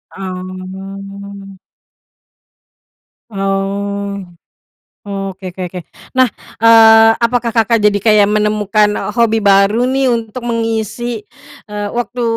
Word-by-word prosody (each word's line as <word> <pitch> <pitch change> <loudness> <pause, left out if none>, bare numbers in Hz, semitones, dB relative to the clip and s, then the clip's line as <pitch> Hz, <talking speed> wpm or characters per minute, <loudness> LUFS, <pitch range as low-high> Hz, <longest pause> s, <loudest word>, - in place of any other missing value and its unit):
Oh. 195 +1 -8 1.7
Oh, 200 0 -2 0.9
oke 195 -1 -5
oke 190 - -7
oke. 180 - -6 0.3
Nah, 260 -1 +3 0.3
eee, 225 0 +7
apakah 235 0 0
Kakak 230 0 +3
jadi 205 -1 +2
kayak 215 -2 +5
menemukan, 210 0 +1
eee, 210 - -3
hobi 225 -1 +2
baru 200 +4 +3
nih 265 -1 +1
untuk 230 +1 -3
mengisi, 230 -1 -3 0.5
eee, 205 0 -3
waktu 240 0 -3
210 Hz, 95 wpm, -15 LUFS, 195-230 Hz, 1.7 s, eee